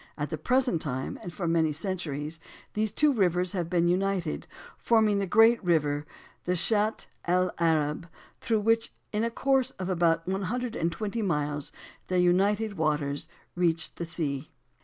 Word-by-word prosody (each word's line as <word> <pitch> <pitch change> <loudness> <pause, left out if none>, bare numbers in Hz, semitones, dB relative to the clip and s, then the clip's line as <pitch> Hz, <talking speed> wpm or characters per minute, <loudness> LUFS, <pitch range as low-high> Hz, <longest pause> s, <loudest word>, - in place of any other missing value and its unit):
At 150 +1 -3
the 160 - -2
present 250 - +2
time, 130 -2 -4
and 175 - -6
for 175 0 -4
many 165 -1 +2
centuries, 155 -3 -3 0.3
these 215 0 0
two 300 -1 +3
rivers 180 -5 +1
have 175 -4 -2
been 175 -1 +2
united, 185 -2 0 0.3
forming 220 -3 +3
the 195 - -1
great 225 +4 +5
river, 150 -4 +1 0.4
the 180 - +1
Shat 215 +4 +1 0.2
el 180 +1 +2
Arab, 160 -1 +1 0.3
through 225 -3 0
which, 225 +2 +2 0.2
in 210 +1 +1
a 230 - +1
course 265 +1 +1
of 185 0 -4
about 165 -2 +2
one 190 +1 -1
hundred 245 -1 -2
and 165 +1 0
twenty 215 +5 -3
miles, 150 -6 -1 0.4
their 185 - 0
united 200 +3 +2
waters 150 -2 0 0.3
reach 170 -2 0
the 170 - -5
sea. 150 -5 -3
180 Hz, 160 wpm, -28 LUFS, 160-210 Hz, 0.4 s, great